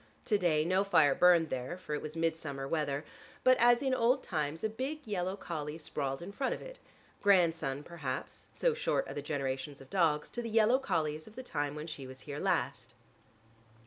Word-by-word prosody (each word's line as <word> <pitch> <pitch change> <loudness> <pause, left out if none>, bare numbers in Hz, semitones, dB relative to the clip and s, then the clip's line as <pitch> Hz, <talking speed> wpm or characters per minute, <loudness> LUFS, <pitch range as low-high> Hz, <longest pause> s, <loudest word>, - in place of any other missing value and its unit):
To 210 - +3
day, 155 -4 +2
no 185 +3 +3
fire 155 -8 +5
burned 175 -1 +5
there, 130 +7 -3
for 165 -4 -6
it 150 - -1
was 155 +1 -6
midsummer 160 -4 -2
weather; 145 -2 -1 0.4
but 255 0 +7
as 240 +2 +5
in 265 -1 +1
old 255 +2 +3
times 155 -2 -2
a - - +3
big 270 +7 -4
yellow 190 -2 -1
collie 155 -5 -5
sprawled 140 -2 -3
in 190 - -7
front 265 +6 -1
of - - -11
it, - - -10 0.4
grandson 165 -8 +3
perhaps, 140 -6 -5
so - - +2
short 480 - 0
are - - -6
the 145 - -4
generations 140 -1 -3
of 135 - -14
dogs, 160 -6 +2
to 240 - -3
the 230 - -4
yellow 225 +3 +4
collies 155 - -1
of 215 - -14
the 255 - -6
time 145 - -2
when 150 0 -5
she 145 -5 -7
was 130 0 -10
here 145 0 -6
last. - - -1
165 Hz, 200 wpm, -32 LUFS, 145-210 Hz, 0.4 s, but